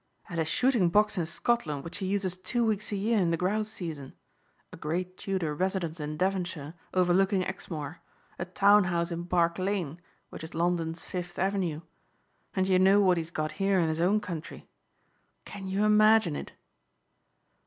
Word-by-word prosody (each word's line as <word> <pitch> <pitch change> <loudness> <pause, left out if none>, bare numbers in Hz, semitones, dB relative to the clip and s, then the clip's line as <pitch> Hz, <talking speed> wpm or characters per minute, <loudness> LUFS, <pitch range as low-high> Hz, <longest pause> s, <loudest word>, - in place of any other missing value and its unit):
"And 170 -2 -3
a 160 - +1
shooting 225 +2 +2
box 210 +4 +3
in 165 - -1
Scotland 165 -6 -1
which 165 +4 -6
he 190 - -2
uses 190 -2 0
two 235 +6 0
weeks 215 -1 -1
a - - -1
year 215 +3 +1
in 175 -3 +2
the 165 - +1
grouse 210 +5 0
season. 155 -9 -6 0.6
A - - -6
great 180 +4 -3
Tudor 185 -6 -2
residence 175 -1 -2
in 150 0 -4
Devonshire 175 -5 -2 0.2
overlooking 185 +1 +3
Exmoor, 170 -4 -6 0.4
a 175 - -2
town 200 +2 +5
house 170 -1 -1
in 170 +1 -4
Park 170 -1 +1
Lane 185 -4 -2 0.3
which - - -8
is 160 - -9
London's 165 -1 -1
Fifth 180 -1 -6
Avenue! 185 -5 -1 0.7
And 190 -1 +1
you 185 -1 +4
know 195 +2 +6
what 185 -3 +4
he's 165 -1 -3
got 155 -2 -2
here 195 -1 +3
in 165 -2 +2
his 160 +1 -1
own 195 +5 +3
country. 165 -5 -7 0.8
Can 195 -2 -8
you 195 +2 +1
imagine 215 -5 +5
it?" - - -7
180 Hz, 175 wpm, -29 LUFS, 165-195 Hz, 0.8 s, know